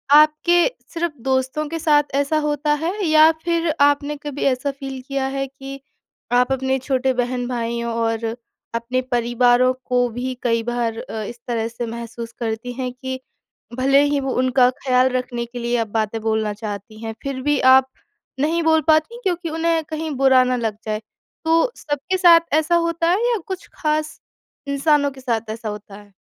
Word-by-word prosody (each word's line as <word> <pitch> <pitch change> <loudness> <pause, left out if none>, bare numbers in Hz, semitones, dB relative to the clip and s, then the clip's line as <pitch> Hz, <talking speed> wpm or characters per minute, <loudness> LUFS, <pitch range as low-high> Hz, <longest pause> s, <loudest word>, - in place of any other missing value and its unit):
आपके 310 +3 +5 0.3
सिर्फ़ 335 -2 -2
दोस्तों 265 +3 0
के 330 0 -4
साथ 295 -2 +4
ऐसा 285 +2 +1
होता 295 0 +1
है? 325 +4 -1
या 310 0 +6
फिर 335 -1 0
आपने 290 +1 +3
कभी 285 -1 -4
ऐसा 275 +1 +1
फ़ील 270 -1 -7
किया 275 -1 -1
है 275 0 -2
कि 275 0 -9 0.5
आप 250 +2 +3
अपने 265 0 0
छोटे 260 0 0
बहन-भाईयों 240 -2 -2
और 225 0 -1 0.5
अपने 250 +2 -1
परिवारों 245 +1 +3
को 245 -1 +2
भी 250 +3 -4
कई 230 -1 +2
बार 235 -1 -2
अ, 220 -1 -5
इस 235 +3 -8
तरह 230 -2 -1
से 235 +1 -5
महसूस 235 0 -7
करतीं 230 +1 -3
हैं 255 0 -3
कि 260 0 -5 0.6
भले 275 +2 +4
ही 290 -1 +1
वो 270 -1 -2
उनका 255 -1 +4 0.2
ख़्याल 255 0 +4
रखने 250 -1 -2
के 240 +1 -8
लिए 240 +1 0
आप 225 -1 -1
बातें 220 +1 -1
बोलना 220 -1 0
चाहती 210 0 -7
हैं 225 0 -4
फिर 275 -2 -4
भी 295 -1 +2
आप 265 0 +5 0.5
नहीं 320 +4 +1
बोल 320 -1 +4
पातीं 315 +9 +3
क्योंकि 350 -3 -1
उन्हें 325 0 0
कहीं 315 0 -3
बुरा 265 -1 +5
ना 255 0 0
लग 225 -4 -2
जाए? 215 0 -2 0.4
तो 330 +9 +3
सबके 290 +5 -2
साथ 345 -2 +7
ऐसा 315 +2 +2
होता 335 0 +1
है 365 - +3
या 460 - +1
कुछ 380 -1 -6
ख़ास 305 0 -1 0.5
इंसानों 285 0 +2
के 265 -1 -13
साथ 230 -3 -2
ऐसा 225 -1 -5
होता 210 -1 -8
है? 205 -1 -15
260 Hz, 175 wpm, -21 LUFS, 235-300 Hz, 0.6 s, साथ